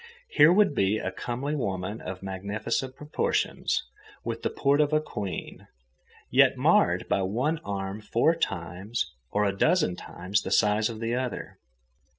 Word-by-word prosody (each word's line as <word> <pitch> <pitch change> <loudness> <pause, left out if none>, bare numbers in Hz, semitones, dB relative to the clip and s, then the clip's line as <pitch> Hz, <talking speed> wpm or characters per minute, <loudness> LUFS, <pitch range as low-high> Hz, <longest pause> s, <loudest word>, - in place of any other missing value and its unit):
Here 155 - +6
would 200 -3 +4
be 100 -3 +2
a 95 - -3
comely 125 +8 -3
woman 100 -4 -3
of 95 0 -7
magnificent 100 +7 -3
proportions, 150 +2 -1 0.4
with 115 0 -4
the - - 0
port 140 +1 +2
of 150 0 +1
a 155 - +5
queen, 100 - -6 0.6
yet - - +5
marred - - +3
by - - +1
one 125 +12 0
arm 100 -1 -4
four 120 +9 +2
times—or 90 - -3
a 100 -1 0
dozen 125 - +2
times—the 95 +3 -3
size 105 +2 +3
of 110 -1 -7
the 115 +1 -1
other. 125 0 -4
110 Hz, 145 wpm, -27 LUFS, 95-135 Hz, 0.6 s, Here